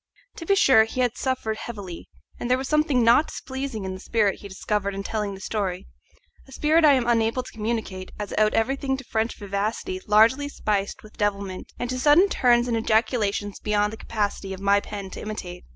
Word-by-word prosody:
To 330 - -8
be 395 - +4
sure 255 - +6
he 255 +3 -3
had 245 -1 +1
suffered 245 -5 -2
heavily, 200 -8 -8 0.3
and 240 - -4
there 255 - +4
was 265 0 -4
something 300 -5 +2
not 235 +7 +5
displeasing 265 -6 -5
in 190 - -4
the 185 - -8
spirit 210 -1 0
he 200 - -9
discovered 200 +1 -2
in 195 - -4
telling 210 -1 -3
the - - -11
story 190 -2 -3 0.6
a - - -16
spirit 310 +4 +2
I 295 -2 +7
am 255 -3 +2
unable 230 +1 +1
to - - -11
communicate, 215 -4 -4
as 205 -1 -5
it - - -1
owed 215 0 +3
everything 265 +3 0
to 270 - -9
French 225 -1 -2
vivacity 210 - -3
largely 230 +7 +4
spiced 205 -7 -2
with 215 - -16
devilment, 200 -3 -2
and 245 - -3
to 255 - -2
sudden 305 +9 +5
turns 240 -5 +3
and 235 - 0
ejaculations 220 -2 0
beyond 210 0 0
the - - -7
capacity 205 -3 -3
of - - -13
my 200 +1 +3
pen 200 -2 -7
to - - -7
imitate. 180 -5 -6
220 Hz, 205 wpm, -24 LUFS, 200-255 Hz, 0.6 s, I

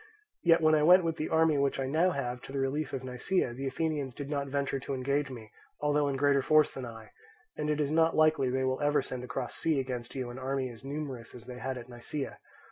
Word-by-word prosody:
Yet 165 -1 +5
when 155 0 +5
I 155 - +4
went 180 +4 +7
with 165 -1 -1
the 155 - -2
army 160 -2 +3
which 140 -1 +1
I 135 - 0
now 160 +7 +3
have 125 -6 -3
to - - -10
the 140 - -3
relief 135 +2 -1
of 130 - -4
Nisaea, 125 +2 0
the 135 +3 -4
Athenians 145 -2 -2
did 145 0 -6
not 140 -1 -1
venture 140 0 -1
to 140 +1 -4
engage 140 +2 0
me 115 -4 -9 0.3
although 150 0 +2
in 140 - -1
greater 140 0 +3
force 155 +2 +4
than 130 -2 -5
I; 115 -2 -11 0.4
and 150 0 -2
it 150 0 +1
is 145 -1 0
not 165 +1 +3
likely 155 -4 +4
they 130 +1 0
will 130 +1 0
ever 145 -1 +2
send 125 -1 -5
across 125 - -4
sea 160 -4 +1
against 125 -2 -4
you 130 -2 -3
an 125 - -8
army 130 -1 -2
as 115 +2 -13
numerous 135 -5 -5
as 120 - -11
they 125 -1 -8
had 130 +2 -3
at 120 -1 -8
Nisaea. 125 +3 -5
140 Hz, 245 wpm, -30 LUFS, 130-150 Hz, 0.4 s, went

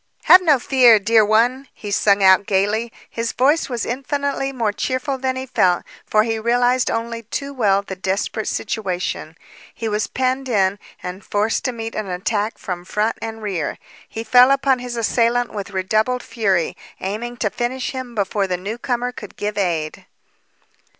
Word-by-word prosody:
"Have 370 - +8
no 310 -6 +4
fear, 245 -3 +5
dear 220 +2 +4
one!" 240 +6 +2
he 205 - -7
sung 200 0 +3
out 190 +1 +6
gaily. 210 +3 +1 0.2
His 230 0 -3
voice 290 +6 +2
was 240 -2 -2
infinitely 275 +2 -2
more 230 -6 -1
cheerful 260 +4 -2
than 260 0 -1
he 260 0 -4
felt, 185 -8 +2 0.2
for 215 0 +3
he 225 0 -1
realized 245 +2 +2
only 230 0 -3
too 275 +5 -5
well 200 -6 +2
the 190 - -6
desperate 195 +3 -2
situation; 180 -6 -3 0.3
he 225 - -5
was 210 0 -1
penned 260 +1 -1
in 200 -3 +2 0.2
and 180 +2 -6
forced 210 +3 0
to 255 - +1
meet 225 -1 -6
an 215 -2 -4
attack 205 +4 -2
from 175 -2 -5
front 210 +4 -1
and 225 -1 -6
rear. 180 -8 -2 0.3
He 225 - -5
fell 250 +2 +6
upon 275 -1 +3
his 245 -1 -5
assailant 235 +1 +1
with 205 -2 -5
redoubled 215 +6 0
fury, 195 -8 0 0.2
aiming 230 +5 -4
to 210 -3 -1
finish 250 +1 -2
him 255 -3 -7
before 200 -1 0
the 180 -1 -1
newcomer 240 +5 -3
could 210 -5 -11
give 205 0 -3
aid. 170 -6 -2
225 Hz, 170 wpm, -20 LUFS, 200-250 Hz, 0.3 s, Have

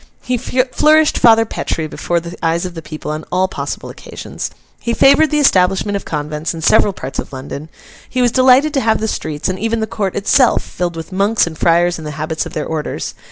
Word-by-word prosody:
He 250 - -1
flourished 265 +5 +2
Father 225 -1 +6
Petre 160 -6 -3
before 170 +3 -2
the 170 +1 -8
eyes 165 +2 +1
of 180 - -5
the 165 - -7
people 155 -1 -6
on 155 +1 -4
all 185 +1 +2
possible - - -5
occasions. - - -7 0.3
He 235 0 -2
favoured 280 +3 +5
the 300 - 0
establishment 195 -6 +3
of 200 - -4
convents 150 +1 -3
in 165 - -7
several 200 - +4
parts 135 -7 -6
of - - -5
London. 140 +3 -7 0.4
He 255 - -2
was 245 -1 +3
delighted 260 +4 +4
to 275 - +1
have 220 -2 +2
the 220 - -1
streets, 155 -7 -3
and 185 0 -2
even 225 +1 -1
the 220 - 0
court 210 -4 -3
itself, 235 +5 +3
filled 175 -1 -4
with 165 +3 -7
Monks 200 +3 +2
and 170 -2 -6
Friars 170 +2 +2
in - - -8
the 150 - -5
habits 160 +1 -2
of - - -12
their 155 - -3
orders. 155 -2 -4
185 Hz, 215 wpm, -17 LUFS, 160-235 Hz, 0.4 s, Father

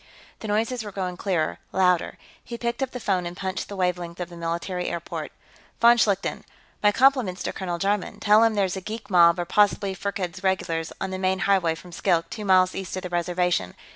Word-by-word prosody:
The 220 - -6
noises 220 +3 0
were 205 - -7
growing 185 -2 -3
clearer, 175 -4 -1
louder. 180 -2 +2 0.3
He 235 - -7
picked 235 +2 -3
up 265 - 0
the 250 - -7
phone 185 -5 0
and 175 +1 -8
punched 190 0 -4
the 200 - -6
wavelength 180 -2 -2
of 180 -1 -4
the 175 - -11
military 170 +2 -3
airport. 170 0 -5 0.5
"Von 235 +1 +7
Schlichten, 200 -3 0 0.4
my 205 - +5
compliments 250 -6 +2
to - - -3
Colonel 175 -3 -3
Jarman. 195 +2 -1
Tell 210 +2 +5
him 225 -1 +3
there's 195 -2 +1
a 190 - -5
geek 215 +2 -7
mob, 170 -1 +6
or 175 - -2
possibly 200 0 +2
Firkked's 190 -2 -4
regulars, 170 -3 -1
on 190 - -3
the 185 - -4
main 190 0 +1
highway 185 -5 +2
from 175 +2 -13
Skilk, 170 -1 0
two 215 -2 -5
miles 185 -1 +4
east 190 -2 -5
of 185 - -5
the 180 - -4
Reservation. 175 - 0
190 Hz, 205 wpm, -25 LUFS, 175-205 Hz, 0.5 s, Von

